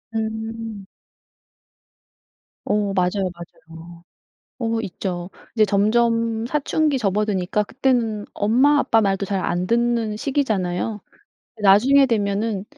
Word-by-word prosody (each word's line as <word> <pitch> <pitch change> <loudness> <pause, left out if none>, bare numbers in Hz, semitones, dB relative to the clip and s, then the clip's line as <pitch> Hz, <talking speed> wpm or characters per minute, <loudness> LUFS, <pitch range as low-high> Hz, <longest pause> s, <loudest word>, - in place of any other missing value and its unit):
음. 220 -1 -4 1.8
어 205 -1 0
맞아요, 185 +1 0
맞아요. 170 0 -13 0.6
어 230 -2 -1
있죠. 180 -2 -5 0.2
이제 220 -2 +4
점점 230 +2 +1
사춘기 300 +1 0
접어드니까 205 -2 0
그때는 230 -3 -1
엄마 255 +8 +3
아빠 225 -5 +3
말도 195 -2 0
잘 195 -1 -2
안 175 +1 -1
듣는 235 -1 0
시기잖아요. 215 -6 -1 0.6
나중에 245 +8 +6
되면은 205 -2 -1
215 Hz, 220 characters per minute, -21 LUFS, 195-230 Hz, 1.8 s, 나중에